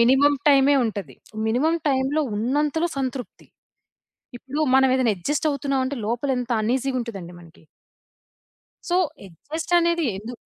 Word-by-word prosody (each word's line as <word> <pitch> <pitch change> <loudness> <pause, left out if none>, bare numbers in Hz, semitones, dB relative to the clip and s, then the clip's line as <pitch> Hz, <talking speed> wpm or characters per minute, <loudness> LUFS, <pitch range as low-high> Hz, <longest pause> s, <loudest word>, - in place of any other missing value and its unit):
Minimum 270 +4 +5
టైమే 280 0 +5
ఉంటది. 200 - -4 0.3
Minimum 310 +9 +1
టైమ్‌లో 270 +3 +1 0.2
ఉన్నంతలో 295 +8 0
సంతృప్తి. 255 -2 -5 0.9
ఇప్పుడు 280 +5 -5 0.2
మనమేదైనా 260 -3 +3
అడ్జస్ట్ 295 - -1
అవుతున్నామంటే, 275 -1 -1
లోపల 240 +5 -2
ఎంత 245 -1 -5
అన్‌ఈజీగా 255 +3 0
ఉంటదండి 195 -7 -8
మనకి. 165 0 -18 1.2
సో, 355 - +2 0.3
అడ్జస్ట్ 305 - -7
అనేది 340 -2 +1
ఎందుకు? 230 +3 -8
265 Hz, 115 wpm, -23 LUFS, 235-290 Hz, 1.2 s, Minimum